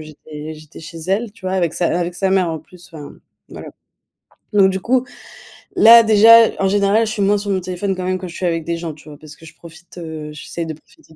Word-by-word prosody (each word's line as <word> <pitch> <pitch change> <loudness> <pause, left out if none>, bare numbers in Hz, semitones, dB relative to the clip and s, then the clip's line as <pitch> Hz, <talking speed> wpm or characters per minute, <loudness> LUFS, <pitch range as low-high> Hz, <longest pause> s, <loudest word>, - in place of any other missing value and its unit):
j'étais 155 0 -10
j'étais 155 0 -14
chez 165 +1 -10
elle 195 +7 -3
tu 195 -3 -11
vois? 185 - -2
Avec 175 -4 0
sa 175 - -1
avec 175 0 -3
sa 190 +2 -1
mère 190 -3 +1
en 160 - -4
plus 175 +2 -17
enfin 150 -3 -10 0.3
voilà. - - -10 0.9
Donc 195 -2 +4
du 190 0 -3
coup 250 +4 0 0.7
là 230 +1 +8
déjà, 220 +1 +6
en 195 - +1
général 205 +3 +2
je 215 - -4
suis 210 - -4
moins 205 +1 +2
sur 205 0 -6
mon 190 -1 -1
téléphone 185 +2 -4
quand 185 - -6
même, 185 0 -1
quand 185 - -7
je 170 - -11
suis 185 - -4
avec 165 -2 -1
des 170 0 -3
gens, 165 -2 -6
tu 150 - -18
vois? 145 - -12
Parce 150 -1 -14
que 165 - -17
je 160 0 -15
profite, 170 +1 -16
heu, 160 -3 -8
j'essaie 165 +3 -7
de 160 - -5
profiter 160 +1 -21
180 Hz, 250 wpm, -18 LUFS, 160-200 Hz, 0.9 s, là